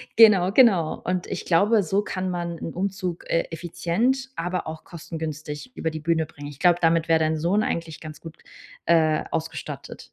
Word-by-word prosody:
Genau, 200 -5 +7
genau. 195 - +4
Und 180 0 -2
ich - - -4
glaube, 200 +5 +4
so 195 +5 +1
kann 185 -2 -3
man 170 -1 -3
'n 165 - -5
Umzug, 185 -2 -3
äh, 165 - +2
effizient, 175 - -1
aber 175 +1 -2
auch 160 0 -7
kostengünstig 155 - -6
über 160 - -1
die 155 - -5
Bühne 160 0 +1
bringen. 145 0 -10
Ich 145 -2 -11
glaube, 175 -1 +4
damit 165 0 +3
wär 160 0 +5
dein 160 0 +1
Sohn 180 +7 +1
eigentlich 165 -5 -3
ganz 155 -1 -10
gut, 165 -1 -10 0.5
äh, 160 -2 +3
ausgestattet. 155 -4 -5
170 Hz, 180 wpm, -24 LUFS, 160-185 Hz, 0.5 s, Genau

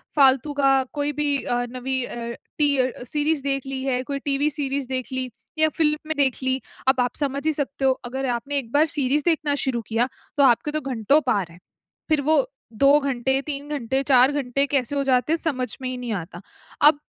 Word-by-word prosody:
फालतू 275 +1 +4
का 270 -1 +3
कोई 290 0 -1
भी 285 -1 +2
अ, 245 - -1
नवी 255 +1 -2
अ, - - -7 0.4
टी 290 -2 +4
अ, 255 -1 -1
सीरीज़ 295 +2 -1
देख 275 -1 -1
ली 270 -1 -4
है, 255 -2 0
कोई 280 +1 -4
टीवी 285 +1 +2
सीरीज़ 275 -2 -3
देख 255 -1 -2
ली, 260 -1 -1 0.3
या 315 - +5
फ़िल्म 300 -2 +2
में 315 - -2
देख 270 -3 +2
ली, 260 0 +1 0.3
अब 265 -1 +4
आप 245 - -1
समझ 280 0 -2
ही 315 - +2
सकते 280 -1 -3
हो 265 - +5
अगर 265 +2 -4
आपने 280 +4 -3
एक 230 -3 -9
बार 300 +2 +4
सीरीज़ 285 +1 +1
देखना 310 -4 +1
शुरू 240 -3 -1
किया 235 +3 0 0.3
तो 280 - +5
आपके 250 +3 +3
तो 310 0 -2
घंटों 270 +3 +2
पार 200 -7 +1
हैं। 170 - -16 0.5
फिर 305 -2 +3
वो 300 -1 +3 0.3
2 280 +6 +5
घंटे, 265 -1 0
3 285 0 -5
घंटे, 270 -2 -1
4 260 0 +5
घंटे 275 -1 0
कैसे 275 0 -1
हो 280 - +1
जाते 260 +3 +2
हैं - - +2
समझ 255 -8 -2
में 255 - -3
ही 255 - -4
नहीं 245 -3 -4
आता। 175 -1 -6 0.4
अब 295 0 +7
275 Hz, 215 wpm, -23 LUFS, 255-290 Hz, 0.5 s, अब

